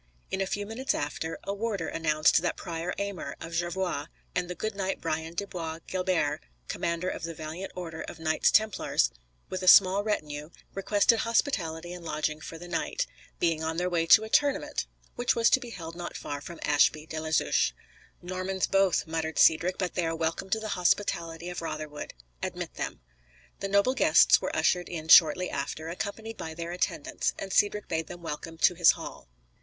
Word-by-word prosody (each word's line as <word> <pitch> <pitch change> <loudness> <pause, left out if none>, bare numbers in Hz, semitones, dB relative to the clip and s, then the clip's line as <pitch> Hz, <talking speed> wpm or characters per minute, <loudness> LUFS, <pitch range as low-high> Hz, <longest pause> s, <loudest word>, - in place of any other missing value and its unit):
In 190 - -1
a 195 - 0
few 205 +1 -2
minutes 230 +6 -2
after, 155 +3 -3
a 200 - -2
warder 200 -5 -2
announced 155 0 +3
that - - -1
the - - -9
Prior 170 0 -3
Aymer, 200 -8 -4
of 165 - -8
Jorvaulx, 175 -3 -1 0.3
and 180 -1 -1
the 180 - -4
good 215 +5 -3
knight 195 -1 -2
Brian 160 +2 -3
de 200 - -2
Bois 165 -5 -5
Guilbert, 180 -5 0 0.3
commander 170 +2 -2
of - - -3
the 165 -1 -5
valiant 160 +5 -6
order 165 -3 -6
of - - -7
Knights 160 -1 +2
Templars, 215 -1 +2 0.4
with 185 - -4
a 185 - -3
small 190 +2 +8
retinue, 150 -8 -3 0.2
requested 205 +3 +3
hospitality 175 - 0
and 180 -1 -9
lodging 155 -1 -2
for 165 - -8
the 175 +2 -10
night, - - -1 0.3
being 165 -2 +1
on 160 +1 -2
their 180 +1 0
way 165 -1 +1
to 220 - +8
a 220 - -6
tournament 285 +3 +1 0.3
which 245 - +2
was 230 0 +4
to - - +5
be 245 -2 -8
held 165 -6 -8
not 175 0 -6
far 145 -1 -5
from 170 +2 -9
Ashby 150 +1 +3
de 160 0 -5
la 160 0 -4
Zouche. 145 - +2 0.5
"Normans 185 +1 -1
both," 195 -2 +2
muttered 160 -1 -3
Cedric; 170 +3 +4
"but 180 -3 -2
they 175 -2 0
are 165 - -1
welcome 165 +4 -2
to 220 - +1
the 220 0 -5
hospitality 170 -3 0
of 180 -1 -5
Rotherwood. 155 - -6 0.3
Admit - - -4
them." - - -5 0.6
The 195 - -3
noble 200 +6 +3
guests 265 - +5
were - - -3
ushered 180 -1 +2
in 160 -2 -6
shortly 170 +3 +7
after, 155 +3 -4
accompanied 200 +5 -5
by 160 0 -6
their 170 +1 -5
attendants, 300 - -1
and 195 -1 -5
Cedric 210 0 +2
bade 160 -1 -2
them 175 -1 -10
welcome 165 +1 -6
to 180 - +4
his 170 -1 +6
hall. - - -9
175 Hz, 190 wpm, -28 LUFS, 160-195 Hz, 0.6 s, small